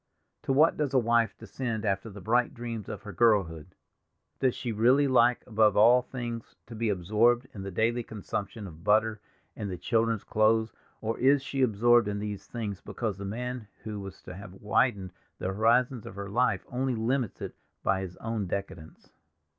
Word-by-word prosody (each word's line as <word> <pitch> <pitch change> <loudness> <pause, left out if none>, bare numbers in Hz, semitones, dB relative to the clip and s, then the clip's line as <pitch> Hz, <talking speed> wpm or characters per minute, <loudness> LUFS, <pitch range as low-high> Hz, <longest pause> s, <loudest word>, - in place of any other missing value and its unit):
To - - -2
what 150 +5 +4
does 140 -3 -1
a - - +7
wife 115 -1 +2
descend 115 -5 -4
after 100 +2 -1
the 100 -1 -10
bright 120 +7 +1
dreams 115 -4 -5
of - - -6
her 105 - -8
girlhood! 90 -5 +1 0.6
Does 130 -2 +2
she 120 - -3
really 125 +6 +4
like 125 -2 +4
above 110 -1 +3
all 120 +4 +7
things 120 -3 -6
to 120 - -11
be 115 0 -1
absorbed 110 +6 +2
in 100 - -7
the 100 - -5
daily 115 +6 +1
consumption 105 -1 -5
of 85 -3 -11
butter, 105 +1 +2 0.3
and 105 -3 -4
the 90 - -4
children's 115 +1 0
clothes, 110 +1 +2 0.3
or 115 +1 -2
is 135 +2 +4
she 135 +1 -2
absorbed 120 -1 +4
in 105 0 -2
these 105 -1 -5
things 105 -5 -5
because 110 -5 -4
the 100 - -5
man 125 +2 -4 0.2
who 105 -2 -5
was 95 -1 -9
to 90 - -8
have 95 0 -10
widened 100 -2 0 0.2
the 95 - -3
horizon 120 +4 +2
of 95 - -9
her 100 0 -6
life 125 +4 +1
only 130 0 -1
limits 115 0 -1
it - - -6 0.3
by 95 -1 +1
his 90 -2 -7
own 110 -3 -3
decadence? 85 -4 -6
110 Hz, 185 wpm, -28 LUFS, 100-120 Hz, 0.6 s, a